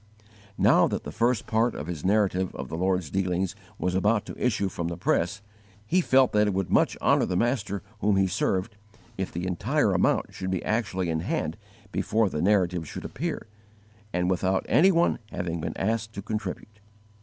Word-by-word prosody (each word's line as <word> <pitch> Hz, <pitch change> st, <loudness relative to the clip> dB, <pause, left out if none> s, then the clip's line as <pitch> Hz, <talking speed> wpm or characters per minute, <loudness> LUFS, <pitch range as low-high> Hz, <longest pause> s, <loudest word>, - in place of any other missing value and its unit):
Now -, -, +5 dB
that -, -, -3 dB
the -, -, -6 dB
first 120 Hz, -1 st, +1 dB
part 115 Hz, +2 st, +1 dB
of 75 Hz, -, -5 dB
his 80 Hz, -3 st, -5 dB
Narrative 95 Hz, -2 st, +1 dB
of -, -, -6 dB
the -, -, -4 dB
Lord's 90 Hz, -2 st, 0 dB
Dealings 95 Hz, 0 st, -1 dB, 0.2 s
was 90 Hz, -, -1 dB
about 105 Hz, +4 st, +2 dB
to -, -, -7 dB
issue 105 Hz, -5 st, +1 dB
from 85 Hz, -3 st, -4 dB
the 85 Hz, -1 st, -4 dB
press, 90 Hz, +3 st, 0 dB, 0.4 s
he 180 Hz, +11 st, +2 dB
felt 130 Hz, -5 st, +4 dB
that 105 Hz, 0 st, +3 dB
it 100 Hz, -, 0 dB
would 95 Hz, -1 st, -1 dB
much -, -, +3 dB
honour -, -, +4 dB
the 90 Hz, -, -1 dB
Master 105 Hz, -4 st, -1 dB, 0.2 s
whom 105 Hz, -1 st, +2 dB
he 95 Hz, 0 st, +3 dB
served 95 Hz, +2 st, -1 dB, 0.4 s
_if 95 Hz, -2 st, -3 dB
the 85 Hz, +2 st, -4 dB
entire 90 Hz, -2 st, +1 dB
amount -, -, +1 dB
should 95 Hz, -, -4 dB
be 95 Hz, -2 st, -2 dB
actually 100 Hz, -6 st, -1 dB
in 80 Hz, -, 0 dB
hand 80 Hz, -, -2 dB, 0.4 s
before 110 Hz, -1 st, +1 dB
the 75 Hz, -, -2 dB
Narrative 90 Hz, -4 st, +2 dB
should -, -, -7 dB
appear, 165 Hz, +2 st, -4 dB, 0.7 s
and 90 Hz, -1 st, 0 dB
without 95 Hz, +1 st, +1 dB
any 190 Hz, +5 st, +5 dB
one 170 Hz, -1 st, +2 dB
having 85 Hz, -1 st, -3 dB
been -, -, -4 dB
asked 110 Hz, +2 st, -1 dB
to 100 Hz, -, -6 dB
contribute. 105 Hz, 0 st, -5 dB
95 Hz, 190 wpm, -26 LUFS, 90-110 Hz, 0.7 s, Now